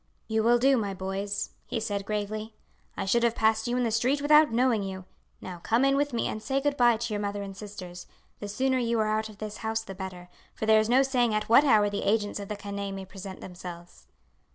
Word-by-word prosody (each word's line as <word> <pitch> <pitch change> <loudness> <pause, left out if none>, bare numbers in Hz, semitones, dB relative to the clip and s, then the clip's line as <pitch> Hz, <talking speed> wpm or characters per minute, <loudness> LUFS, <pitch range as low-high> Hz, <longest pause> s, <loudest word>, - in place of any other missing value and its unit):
"You 220 0 +1
will 235 +2 +4
do, 265 +2 +4
my 200 -4 -2
boys," 195 +2 -3 0.2
he 230 - -2
said 205 -2 -3
gravely. 215 +1 -3 0.4
"I - - -2
should 235 +5 +2
have 235 -1 +2
passed 220 +1 +2
you 245 +1 0
in 250 - +1
the 230 - 0
street 250 +6 +1
without 300 -1 +5
knowing 235 -2 +2
you. 190 -1 -6 0.4
Now 180 -2 -7
come 230 +9 +2
in 275 0 +3
with 285 +1 +1
me 235 - -1
and 215 - -4
say 270 +4 0
good 285 +1 0
bye 240 -3 +4
to 235 -1 -3
your 205 - -2
mother 205 0 -3
and 195 -1 -8
sisters. 185 -4 -9 0.3
The 205 - -5
sooner 260 +5 0
you 235 -1 0
are 215 - +2
out 220 0 -2
of 210 - -13
this 215 0 -6
house 220 0 -2
the 195 - -8
better, 185 -2 -7 0.3
for - - -3
there 220 0 +6
is 215 +1 0
no 260 +3 +5
saying 245 -4 +1
at 215 0 -2
what 235 +5 +7
hour 220 -7 +4
the 205 0 -2
agents 205 0 0
of 200 - -6
the 210 - -3
canaille 200 -1 -5
may 195 0 -6
present 190 0 -9
themselves." 175 -1 -10
215 Hz, 245 wpm, -28 LUFS, 200-240 Hz, 0.4 s, what